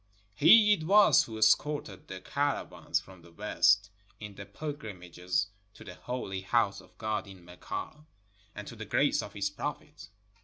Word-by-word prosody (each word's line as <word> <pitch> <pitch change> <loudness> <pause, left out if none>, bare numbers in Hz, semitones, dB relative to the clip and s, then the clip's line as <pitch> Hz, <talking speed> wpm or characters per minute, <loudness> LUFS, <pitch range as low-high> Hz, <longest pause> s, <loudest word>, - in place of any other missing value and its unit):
He 210 - +7
it 185 - -2
was 200 -5 +6
who 110 -1 -8
escorted 110 -1 +1
the 95 0 -8
caravans 145 0 -2
from 95 -2 -15
the 85 0 -17
West, 100 +1 +2 0.3
in 105 -1 -8
the 100 0 -10
pilgrimages 95 - -4 0.3
to - - -13
the 95 - -9
Holy 95 -3 -5
House 100 -1 0
of 90 -1 -22
God 110 -2 -3
in 95 -3 -13
Mecca 90 - -7 0.5
and - - -8
to - - -9
the - - -8
grace - - +2
of - - -9
his 100 -1 -2
prophet. - - -7
105 Hz, 160 wpm, -30 LUFS, 95-140 Hz, 0.5 s, He